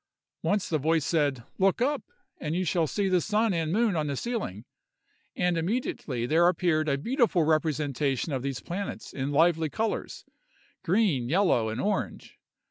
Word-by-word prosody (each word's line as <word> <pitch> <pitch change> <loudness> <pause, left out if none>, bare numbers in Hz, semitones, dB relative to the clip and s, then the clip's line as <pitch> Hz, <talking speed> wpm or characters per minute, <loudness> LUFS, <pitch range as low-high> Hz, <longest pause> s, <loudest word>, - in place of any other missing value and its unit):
Once 205 -2 0
the 155 - 0
voice 160 +1 +1
said, 145 -7 +1 0.2
"Look 195 +2 +3
up, 285 +5 +1 0.4
and 155 +1 -3
you 185 +1 0
shall 170 -2 +1
see 200 +5 -1
the 185 -2 +3
sun 215 +1 +1
and 165 -2 -1
moon 215 0 +2
on 155 -2 0
the 140 - -2
ceiling!" 135 - -4 0.7
and 180 -1 +1
immediately 165 - -2
there 165 +6 +4
appeared 165 -3 +1
a 140 - +1
beautiful 235 - +2
representation 150 -2 0
of 130 - -1
these 135 -1 -3
planets 195 +3 -5
in 135 +1 -2
lively 160 +1 +3
colors, 220 +8 -3
viz., - - -36 0.5
green, 170 - +2
yellow, 160 - +2
and 110 +2 -4
orange. 205 +5 -3
165 Hz, 165 wpm, -27 LUFS, 145-195 Hz, 0.7 s, there